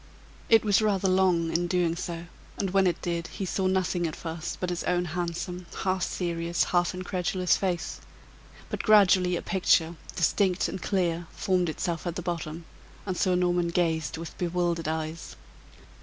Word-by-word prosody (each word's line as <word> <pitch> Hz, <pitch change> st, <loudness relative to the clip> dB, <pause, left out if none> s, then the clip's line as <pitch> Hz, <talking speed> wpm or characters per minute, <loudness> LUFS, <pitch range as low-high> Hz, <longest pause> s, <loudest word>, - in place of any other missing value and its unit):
It 225 Hz, -1 st, +6 dB
was 205 Hz, 0 st, +4 dB
rather 200 Hz, -3 st, +2 dB
long 185 Hz, -3 st, +3 dB
in 175 Hz, +1 st, +1 dB
doing 175 Hz, -2 st, +1 dB
so, 170 Hz, -1 st, -5 dB, 0.3 s
and 195 Hz, -2 st, -1 dB
when 195 Hz, 0 st, +4 dB
it 175 Hz, -, 0 dB
did, 170 Hz, -1 st, -2 dB
he 195 Hz, -, -5 dB
saw 190 Hz, +1 st, 0 dB
nothing 185 Hz, -2 st, +1 dB
at 155 Hz, -, -5 dB
first 165 Hz, 0 st, -5 dB
but 180 Hz, -1 st, -2 dB
his 175 Hz, -, -3 dB
own 180 Hz, 0 st, +1 dB
handsome, 175 Hz, +1 st, -4 dB, 0.2 s
half 185 Hz, -1 st, 0 dB
serious, 170 Hz, -1 st, -1 dB
half 175 Hz, 0 st, +1 dB
incredulous 185 Hz, 0 st, 0 dB
face; 180 Hz, -4 st, -2 dB, 0.7 s
but -, -, -2 dB
gradually 190 Hz, -4 st, +5 dB
a -, -, -3 dB
picture, 170 Hz, -3 st, +2 dB, 0.2 s
distinct 185 Hz, +1 st, +2 dB
and 190 Hz, -, -5 dB
clear, 175 Hz, -4 st, 0 dB
formed 180 Hz, -3 st, +1 dB
itself 170 Hz, +2 st, -3 dB
at 170 Hz, -, -3 dB
the 180 Hz, -, -4 dB
bottom, 165 Hz, -1 st, -4 dB, 0.4 s
and 185 Hz, -2 st, -2 dB
Sir 185 Hz, 0 st, +2 dB
Norman 175 Hz, -1 st, +2 dB
gazed 165 Hz, -2 st, 0 dB
with 165 Hz, 0 st, -7 dB
bewildered 175 Hz, -2 st, 0 dB
eyes. 160 Hz, +1 st, -4 dB
175 Hz, 165 wpm, -27 LUFS, 170-185 Hz, 0.7 s, It